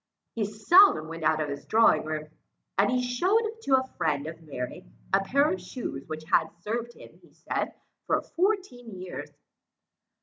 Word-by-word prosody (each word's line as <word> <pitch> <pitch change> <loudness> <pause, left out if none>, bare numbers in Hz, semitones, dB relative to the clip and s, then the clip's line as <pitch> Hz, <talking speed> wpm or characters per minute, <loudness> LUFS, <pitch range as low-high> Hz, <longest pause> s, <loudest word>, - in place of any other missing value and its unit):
He 220 -2 -1
seldom 215 - +5
went 165 0 -7
out 155 0 +2
of 150 - -2
his 140 - -5
drawing 220 -9 +4
room, 155 -1 -4 0.5
and 200 +1 +3
he 250 0 +1
showed 370 - +2
to 275 -11 +3
a 260 0 -1
friend 150 -2 0
of 160 +1 -7
Mary 135 -5 -6 0.3
a - - +6
pair 280 +8 +3
of 185 - -5
shoes, 180 - -6
which 155 0 -6
had 155 - +2 0.2
served 235 +2 -3
him, - - -15
he - - -21
said, - - -3 0.3
for - - +3
fourteen 345 - -2
years. 185 0 -7
210 Hz, 170 wpm, -27 LUFS, 155-255 Hz, 0.5 s, a